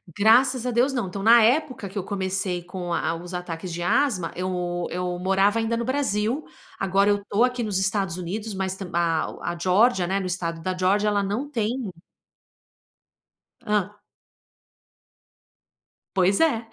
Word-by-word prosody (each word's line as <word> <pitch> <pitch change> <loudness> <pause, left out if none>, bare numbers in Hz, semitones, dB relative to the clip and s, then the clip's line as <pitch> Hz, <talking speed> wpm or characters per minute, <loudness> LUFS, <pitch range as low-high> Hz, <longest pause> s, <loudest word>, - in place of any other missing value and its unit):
Graças 245 +4 +4
a 250 - 0
Deus, 245 +4 +2
não. 240 -7 -1
Então, 195 +2 -6
na 230 +2 +7
época 255 -3 +1
que 200 - -9
eu 195 - -1
comecei 190 -2 -2
com 180 -1 -5
a 165 0 0
os 175 +2 -8
ataques 180 0 -5
de 175 - -4
asma 185 -6 +1
eu 180 -1 -2
eu 180 0 -3
morava 195 +4 +2
ainda 225 +1 0
no 235 - -2
Brasil. 255 0 -1 0.3
Agora, 195 +1 +2
eu 205 -1 0
tô 210 +4 +2
aqui 250 -1 +1
nos 210 -4 -1
Estados 195 -2 0
Unidos, 205 +5 -4
mas 190 -1 -2
tam 190 -3 -7
a 165 -2 -1
a 175 - -6
Geórgia, 190 +1 +3
né 195 +2 0
no 190 - -4
estado 170 -3 -3
da 185 +1 -3
Geórgia 200 +3 +2
ela 205 -1 +1
não 215 +9 -3
tem 235 -3 -2 1.7
Hã. 210 -2 +1 2.3
Pois 190 +1 +3
é. 235 -9 +2
195 Hz, 160 wpm, -24 LUFS, 180-225 Hz, 2.3 s, na